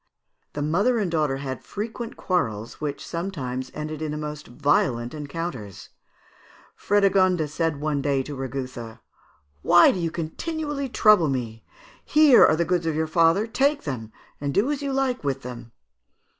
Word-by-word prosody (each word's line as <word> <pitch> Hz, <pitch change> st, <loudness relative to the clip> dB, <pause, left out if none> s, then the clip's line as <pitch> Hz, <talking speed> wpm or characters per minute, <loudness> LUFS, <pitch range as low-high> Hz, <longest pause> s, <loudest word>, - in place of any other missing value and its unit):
"The 145 Hz, -, -3 dB
mother 200 Hz, +11 st, +2 dB
and 200 Hz, -6 st, -1 dB
daughter 150 Hz, -4 st, +1 dB
had 135 Hz, -1 st, -5 dB
frequent 225 Hz, +2 st, -6 dB
quarrels, 115 Hz, -, -2 dB
which 145 Hz, -2 st, -4 dB
sometimes 135 Hz, -8 st, -4 dB
ended 155 Hz, 0 st, -5 dB
in 155 Hz, -, -2 dB
the 150 Hz, -, -3 dB
most 150 Hz, 0 st, -6 dB
violent 120 Hz, -2 st, 0 dB
encounters. 145 Hz, -, -6 dB, 0.9 s
Frédégonde 190 Hz, -5 st, +2 dB
said 155 Hz, 0 st, -2 dB
one 150 Hz, -1 st, -1 dB
day 140 Hz, -1 st, 0 dB
to 145 Hz, +1 st, -7 dB
Rigouthe, 130 Hz, -3 st, -6 dB, 0.6 s
'Why 175 Hz, -, +6 dB
do 185 Hz, -, -4 dB
you 170 Hz, -1 st, -1 dB
continually 280 Hz, -, -4 dB
trouble 210 Hz, -9 st, +5 dB
me? 115 Hz, -4 st, -4 dB, 0.4 s
Here 300 Hz, -4 st, +6 dB
are 155 Hz, -, +5 dB
the 170 Hz, +1 st, 0 dB
goods 175 Hz, -2 st, 0 dB
of 160 Hz, -, 0 dB
your 160 Hz, +1 st, +1 dB
father, 165 Hz, +5 st, +3 dB
take 280 Hz, +6 st, +1 dB
them 115 Hz, -6 st, -5 dB, 0.3 s
and 140 Hz, -1 st, -2 dB
do 235 Hz, +9 st, +2 dB
as 290 Hz, -1 st, -2 dB
you 280 Hz, -1 st, -2 dB
like 265 Hz, -, 0 dB
with 135 Hz, -1 st, -2 dB
them.' 120 Hz, -2 st, -8 dB
155 Hz, 155 wpm, -24 LUFS, 135-195 Hz, 0.9 s, Why